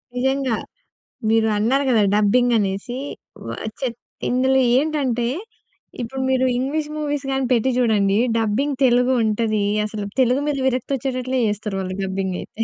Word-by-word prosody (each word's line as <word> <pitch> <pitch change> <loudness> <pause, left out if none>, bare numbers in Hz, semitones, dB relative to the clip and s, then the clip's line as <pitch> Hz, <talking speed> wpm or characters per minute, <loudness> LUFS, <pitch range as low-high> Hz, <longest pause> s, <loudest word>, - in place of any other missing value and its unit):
నిజంగా. 265 -1 +1 0.7
మీరు 225 0 +3
అన్నారు 250 +7 +2
గదా 230 -4 +4
డబ్బింగ్ 240 +4 +3
అనేసి. 200 +4 -2 0.5
వ - - -7 0.3
చెత్ 240 -3 -3 0.3
ఇందులో 260 +1 +3 0.2
ఏంటంటే 270 -5 0 0.7
ఇప్పుడు 260 +3 -4
మీరు 260 0 +2
ఇంగ్లీష్ 295 +4 -1
మూవీస్ 290 -2 -2
గాని 270 0 0
పెట్టి 245 +1 +3
చూడండి. 210 -5 +2 0.2
డబ్బింగ్ 230 +6 0
తెలుగు 250 +1 +3
ఉంటది 215 -1 0 0.2
అసలు 210 -1 -5 0.2
తెలుగు 255 +2 +3
మీద 295 -2 0
విరక్తి 255 0 -1
వచ్చేటట్లే 255 0 -2
జేస్తారు 210 -1 -3
వాళ్ళు 185 0 -4
డబ్బింగ్ 190 -1 -2
అయితే. 225 - -5
245 Hz, 140 wpm, -21 LUFS, 215-265 Hz, 0.7 s, గదా